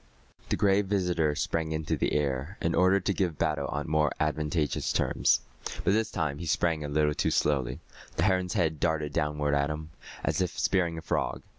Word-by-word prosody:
The -, -, +2 dB
Gray 100 Hz, +1 st, +3 dB
Visitor 90 Hz, -6 st, 0 dB
sprang 80 Hz, +1 st, -1 dB
into 80 Hz, 0 st, -1 dB
the -, -, 0 dB
air, 70 Hz, +5 st, -1 dB
in 85 Hz, -, 0 dB
order 95 Hz, +2 st, +4 dB
to 100 Hz, +2 st, 0 dB
give 90 Hz, -5 st, -1 dB
battle -, -, 0 dB
on 75 Hz, +2 st, -3 dB
more 75 Hz, -1 st, +2 dB
advantageous 75 Hz, 0 st, 0 dB
terms. -, -, +2 dB, 0.4 s
But 95 Hz, -, +3 dB
this 110 Hz, 0 st, +1 dB
time 80 Hz, -5 st, -2 dB
he 85 Hz, -, -5 dB
sprang 85 Hz, -2 st, +1 dB
a -, -, -3 dB
little 75 Hz, 0 st, +2 dB
too -, -, 0 dB
slowly. 70 Hz, -5 st, 0 dB, 0.3 s
The 80 Hz, -, +1 dB
heron's 95 Hz, -2 st, +2 dB
head 80 Hz, -3 st, +1 dB
darted 75 Hz, -3 st, 0 dB
downward 75 Hz, -2 st, 0 dB
at 70 Hz, +1 st, +2 dB
him, 75 Hz, +1 st, -5 dB, 0.3 s
as -, -, 0 dB
if 90 Hz, -1 st, -2 dB
spearing 85 Hz, -4 st, +1 dB
a 80 Hz, -, -7 dB
frog. -, -, -1 dB
80 Hz, 190 wpm, -28 LUFS, 75-90 Hz, 0.4 s, order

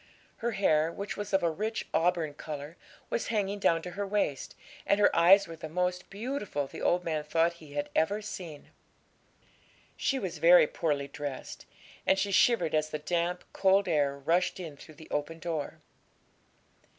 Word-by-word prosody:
Her 235 Hz, 0 st, -2 dB
hair, 160 Hz, -5 st, +2 dB
which 200 Hz, +3 st, -5 dB
was 205 Hz, 0 st, -5 dB
of 195 Hz, -2 st, +2 dB
a 170 Hz, -, +2 dB
rich 215 Hz, +7 st, -3 dB
auburn 165 Hz, -3 st, +1 dB
colour, 150 Hz, +1 st, -7 dB, 0.4 s
was -, -, -1 dB
hanging 205 Hz, -2 st, -1 dB
down 165 Hz, -4 st, +2 dB
to 180 Hz, -, -6 dB
her 200 Hz, +3 st, -4 dB
waist, 195 Hz, -9 st, -1 dB, 0.3 s
and 200 Hz, -, +2 dB
her 205 Hz, -, +4 dB
eyes 190 Hz, +4 st, +6 dB
were 165 Hz, -, -8 dB
the 160 Hz, -1 st, -8 dB
most 180 Hz, +2 st, -1 dB
beautiful 205 Hz, -, -3 dB
the -, -, -9 dB
old 180 Hz, 0 st, +2 dB
man 155 Hz, -3 st, -2 dB
thought 165 Hz, +3 st, +2 dB
he 150 Hz, -2 st, -12 dB
had 145 Hz, 0 st, -3 dB
ever 200 Hz, +6 st, +2 dB
seen. 175 Hz, -8 st, -8 dB, 1.2 s
She 275 Hz, -, 0 dB
was 190 Hz, -8 st, -4 dB
very 175 Hz, 0 st, +7 dB
poorly 145 Hz, -3 st, -1 dB
dressed, 140 Hz, -1 st, -7 dB, 0.4 s
and 190 Hz, -, +4 dB
she 200 Hz, +1 st, 0 dB
shivered 195 Hz, -5 st, +3 dB
as 155 Hz, 0 st, +1 dB
the 155 Hz, -, -3 dB
damp, 175 Hz, +3 st, -1 dB
cold 195 Hz, 0 st, +3 dB
air 145 Hz, -4 st, +1 dB
rushed 170 Hz, +7 st, +1 dB
in 165 Hz, -5 st, -7 dB
through 155 Hz, +2 st, -14 dB
the 160 Hz, -, -13 dB
open 150 Hz, +3 st, -2 dB
door. 165 Hz, -3 st, -4 dB
170 Hz, 175 wpm, -29 LUFS, 155-195 Hz, 1.2 s, very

